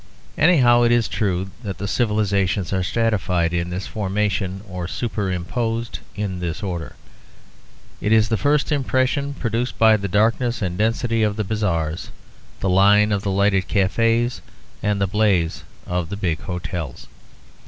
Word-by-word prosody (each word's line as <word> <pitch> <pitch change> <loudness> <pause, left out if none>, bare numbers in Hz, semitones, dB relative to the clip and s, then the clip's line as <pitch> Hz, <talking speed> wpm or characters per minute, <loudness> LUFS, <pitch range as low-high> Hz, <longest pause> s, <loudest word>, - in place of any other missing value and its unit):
Anyhow 130 -7 +5
it 120 0 +4
is 120 -1 +3
true 95 -2 -1
that 100 -6 -5
the 100 +3 -4
civilisations 100 -5 0
are 95 - +1
stratified 90 -4 0
in 85 0 -1
this 90 +2 -4
formation, 100 -2 -2
or 90 -3 -5
superimposed 115 +3 -2 0.2
in 100 -3 -3
this 85 +2 -4
order. 85 -6 -4 1.1
It 105 - 0
is 110 -1 +5
the 115 - +1
first 145 - +1
impression 140 0 0
produced 120 0 -2
by 110 -1 +6
the 100 -1 -3
darkness 115 +5 +1
and 90 -4 -2
density 115 +3 0
of 105 -1 +1
the 110 - -1
bazaars, 90 -7 -2 0.5
the 95 - 0
line 100 +3 +5
of 100 -1 +1
the 100 - -2
lighted 95 -1 +2
cafes 115 +4 +1 0.4
and 105 -1 0
the 100 - +2
blaze 95 -4 +1 0.2
of 90 -2 -2
the 100 - -4
big 85 -6 -1
hotels. 90 -5 -5
105 Hz, 150 wpm, -21 LUFS, 95-115 Hz, 1.1 s, by